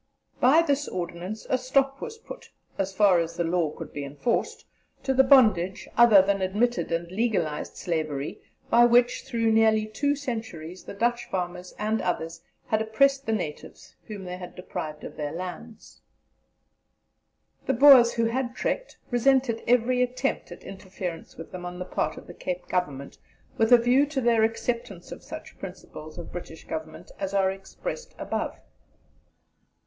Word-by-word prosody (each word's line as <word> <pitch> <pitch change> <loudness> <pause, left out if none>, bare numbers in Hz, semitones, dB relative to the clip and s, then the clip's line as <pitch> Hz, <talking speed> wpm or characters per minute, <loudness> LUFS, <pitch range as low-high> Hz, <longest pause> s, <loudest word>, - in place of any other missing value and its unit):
By 295 +7 +6
this 285 -2 0
ordinance 180 +4 -5
a 255 - +1
stop 270 +2 +1
was 455 -1 -6
put, 470 +2 -11 0.3
as 195 0 0
far 190 -2 +4
as 165 0 -3
the 170 - +1
law 170 -1 +1
could 150 - -9
be 145 - -4
enforced, 145 - -2 0.4
to 265 - +1
the 265 0 +6
bondage, 215 -9 +4
other 220 -5 +7
than 200 0 0
admitted 210 +6 0
and 170 +1 -2
legalized 190 -8 -1
slavery, 155 -4 -3 0.3
by 235 +1 +7
which 240 0 +3
through 230 -1 +1
nearly 220 -1 +4
two 285 +7 0
centuries 220 - -6
the - - -8
Dutch 240 +3 0
farmers 180 -1 -4
and 215 +1 0
others 165 -2 -3 0.2
had 220 0 0
oppressed 270 +5 +2
the - - +1
natives 175 -9 -5
whom 205 -3 -7
they 180 0 -5
had 180 -1 -9
deprived 155 -4 -6
of - - -9
their 150 -1 -3
lands." 185 +6 -8 1.7
The 270 - +3
Boers 255 -2 +8
who 230 -1 +1
had 245 +2 -1
trekked - - -3
resented 245 -1 +2
every 250 +1 +3
attempt 250 0 -1
at - - -10
interference 185 -3 -7
with 165 - -9
them 180 -1 -7
on 180 0 -6
the 180 - -5
part - - -2
of - - -10
the - - -10
Cape 180 0 -5
Government 145 -7 -3 0.4
with 225 +1 +2
a 245 - +10
view 250 +5 +3
to 290 -2 -2
their 235 -3 +3
acceptance 225 -5 -2
of - - -8
such - - -10
principles 155 +2 -9
of 170 - -8
British 170 -2 -8
Government 160 +2 -7
as 195 0 -3
are 190 -1 +3
expressed 195 - -7
above. - - -3
215 Hz, 165 wpm, -26 LUFS, 175-245 Hz, 1.7 s, a